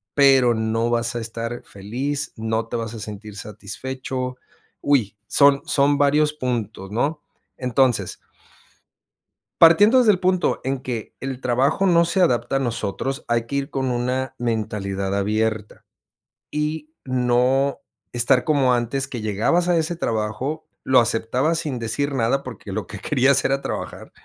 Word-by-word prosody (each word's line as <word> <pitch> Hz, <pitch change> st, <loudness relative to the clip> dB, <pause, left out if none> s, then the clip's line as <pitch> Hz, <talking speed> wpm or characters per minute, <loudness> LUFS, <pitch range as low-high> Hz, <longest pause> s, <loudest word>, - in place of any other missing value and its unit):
pero 135 Hz, -4 st, +5 dB
no 110 Hz, +1 st, 0 dB
vas 120 Hz, +1 st, 0 dB
a -, -, -1 dB
estar 115 Hz, +1 st, -5 dB
feliz, 135 Hz, +9 st, -4 dB
no 110 Hz, 0 st, -2 dB
te 120 Hz, -, -2 dB
vas 115 Hz, 0 st, -4 dB
a 115 Hz, -, -7 dB
sentir 105 Hz, 0 st, -8 dB
satisfecho. 130 Hz, +4 st, -5 dB, 0.4 s
Uy, 110 Hz, -8 st, +1 dB
son 140 Hz, -1 st, +5 dB
son 140 Hz, 0 st, +2 dB
varios 150 Hz, +1 st, +3 dB
puntos, 115 Hz, -8 st, -3 dB
¿no? 140 Hz, +8 st, -1 dB, 0.4 s
Entonces 125 Hz, -6 st, +1 dB, 1.4 s
partiendo 205 Hz, +10 st, +7 dB
desde 220 Hz, -4 st, +5 dB
el 180 Hz, -, -2 dB
punto 185 Hz, -1 st, +1 dB
en 135 Hz, 0 st, -1 dB
que 120 Hz, -4 st, -5 dB
el 130 Hz, -1 st, -5 dB
trabajo 130 Hz, +10 st, +1 dB
no 170 Hz, -2 st, +4 dB
se 185 Hz, +2 st, +1 dB
adapta 120 Hz, -5 st, +2 dB
a -, -, +3 dB
nosotros, 120 Hz, +3 st, -3 dB
hay 120 Hz, -1 st, 0 dB
que 140 Hz, -, -5 dB
ir 140 Hz, 0 st, -2 dB
con 130 Hz, -2 st, -1 dB
una 125 Hz, +2 st, -1 dB
mentalidad 100 Hz, -4 st, -2 dB
abierta. 105 Hz, +1 st, -1 dB, 0.7 s
Y 150 Hz, +1 st, -3 dB
no 130 Hz, +2 st, +1 dB, 0.3 s
estar 120 Hz, +2 st, +3 dB
como 135 Hz, -5 st, +3 dB
antes 125 Hz, +3 st, -1 dB
que 120 Hz, -4 st, -6 dB
llegabas 115 Hz, -, +1 dB
a 175 Hz, -, +3 dB
ese 165 Hz, +2 st, 0 dB
trabajo, 115 Hz, +4 st, -3 dB, 0.2 s
lo 130 Hz, -1 st, +5 dB
aceptabas 125 Hz, +7 st, +1 dB
sin 135 Hz, -7 st, -3 dB
decir 140 Hz, +5 st, -1 dB
nada 130 Hz, +2 st, +1 dB
porque 125 Hz, -6 st, -8 dB
lo -, -, -3 dB
que -, -, -9 dB
querías 135 Hz, +2 st, +3 dB
era 135 Hz, 0 st, +1 dB
trabajar. -, -, -6 dB
125 Hz, 150 wpm, -22 LUFS, 115-140 Hz, 1.4 s, partiendo